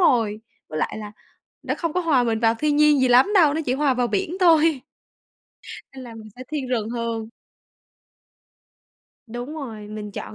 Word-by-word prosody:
rồi, 225 - +2 0.3
với 155 - -5
lại - - -2
là 210 -1 -8 0.5
nó - - -2
không 335 -2 -2
có 360 - 0
hòa 310 -8 +2
mình 225 -2 0
vào 225 -1 +3
thiên 295 +5 0
nhiên 300 -1 +5
gì 260 - +3
lắm 255 +11 +5
đâu, 315 -7 +5
nó 320 - -1
chỉ 250 - +1
hòa 280 -1 +1
vào 245 -1 +1
biển 215 - -2
thôi. 325 -4 +4 1.1
Nên 260 -1 -9
là 235 -2 -10
mình 215 -1 -11
sẽ 255 - -8
thiên 290 -4 -4
rừng 225 -3 -1
hơn. 230 -2 -3 2.0
Đúng 240 +6 -7
rồi, 225 -9 -7
mình 210 -1 -7
chọn, 215 - -7
250 Hz, 185 wpm, -23 LUFS, 225-300 Hz, 2.0 s, nhiên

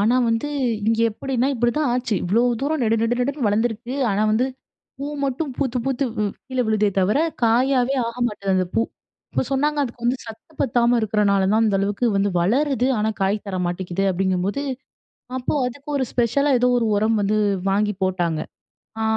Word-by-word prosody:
ஆனா 225 +5 +3
வந்து 230 +6 0 0.4
இங்கே 230 0 +3
எப்படின்னா 260 +3 -1
இப்படிதான் 245 +5 +1
ஆச்சு. 245 -3 -1
இவ்வளோ 215 +7 +2 0.2
தூரம் 290 0 0
நெடு 225 -1 +2
நெடு 240 +2 +1
நெடுன்னு 270 -1 -1
வளர்ந்திருக்கு. 225 +4 -1 0.2
ஆனா 200 +1 +1
வந்து 240 +4 +2 0.5
பூ 280 - -4 0.2
மட்டும் 275 +3 -2
பூத்து 260 -3 -1
பூத்து 270 0 0
வ் 210 - +1 0.2
கீழே 255 -1 -1
விழுதே 215 -1 +2
தவிர, 200 +9 +2 0.2
காயாவே 250 +3 +3
ஆக 235 - -6
மாட்டேங்து, 200 -4 -2
அந்த 185 - 0
பூ. 225 - +3 0.5
இப்போ - - +1
சொன்னாங்க 295 +2 +1
அதுக்கு 240 -3 -6
வந்து 245 +2 +2
சத்து 225 +7 -12
பத்தாம 240 -2 +3
இருக்கிறனால 205 -2 +2
தான், 220 +1 +3
அந்த 210 -3 +2
அளவுக்கு 205 +5 0
வந்து 195 0 +2
வளருது, 255 - +1
ஆனா 215 +1 +1
காய் 195 +2 +2
தர 190 -2 -3
மாட்டேங்குது, 175 +1 -2
அப்பிடீங்கும்போது. 190 +6 0 0.8
அப்போ 250 - -2
அதுக்கு 275 +4 -8
ஒரு 265 - +1
ஸ்பெஷலா 265 +4 +2
ஏதோ 250 +1 +3
ஒரு 230 - 0
உரம் 220 +2 +2
வந்து 205 +1 +1 0.3
வாங்கி 210 +1 +1
போட்டாங்க. 175 -4 0 0.6
அ - - 0
230 Hz, 170 wpm, -22 LUFS, 205-255 Hz, 0.8 s, ஆனா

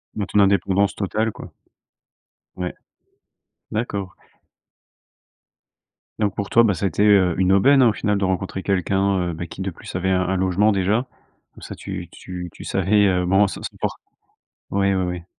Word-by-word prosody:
Bah, 105 - -2
ton 105 - +1
indépendance 100 0 +3
totale, 110 +2 -1
quoi. - - -11 1.0
Ouais, 90 -1 -4 1.0
d'accord. 100 -4 -3 2.0
Donc, 105 -2 0
pour 100 -1 -4
toi, 115 - +5
bah 105 -4 +3
ça 95 +3 -3
a - - +4
été, 100 - 0
heu, 95 -5 +4
une 95 0 +2
aubaine, 135 +8 +5
hein, 120 - +6
au 105 - 0
final 105 -1 0
de 100 - 0
rencontrer 95 0 -2
quelqu'un, 95 -1 0
heu, - - -6
bah, 85 +1 -6
qui 95 - -9
de 95 -1 -2
plus, 85 - -11
avait 95 +1 0
un 95 0 +2
un 95 - 0
logement 95 +3 +2
déjà. 100 +6 0 0.5
Comme - - -16
ça, - - -8
tu - - -7
tu 90 -1 -8
tu - - -12
savais, 100 +2 +2
heu, 90 -1 +1
bon 95 +3 +4
ça - - -7
ça - - -4
dure - - -1 0.8
oui, 100 0 +1
oui 95 -1 0
oui. 90 -1 -4
95 Hz, 185 wpm, -22 LUFS, 90-100 Hz, 2.0 s, hein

